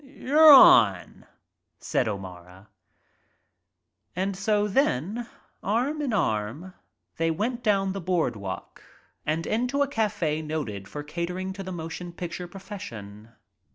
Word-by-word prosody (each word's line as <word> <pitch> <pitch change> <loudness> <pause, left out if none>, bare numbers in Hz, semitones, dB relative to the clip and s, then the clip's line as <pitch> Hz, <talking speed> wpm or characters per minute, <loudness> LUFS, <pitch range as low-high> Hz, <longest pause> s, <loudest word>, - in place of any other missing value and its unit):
"You're 290 +3 +5
on," 105 - +6 0.5
said - - -1
O'Mara. 95 -1 -8 1.6
so 205 +2 0
then, 210 - 0 0.3
arm 255 +9 -1
in 280 -4 -1
arm, 145 - -2 0.4
they 165 0 +1
went 230 +9 -2
down 200 -4 +1
the 195 - -5
broad 175 -7 0
walk 100 -2 -7 0.5
and 160 +2 -1
into 250 +5 0
a - - -2
cafe 205 - -1
noted 145 -11 -5
for 150 - -7
catering 180 +5 -4
to 195 - -8
the 185 -1 -6
motion 170 +1 -6
picture 175 0 -6
profession. 115 - -9
180 Hz, 120 wpm, -26 LUFS, 140-215 Hz, 1.6 s, on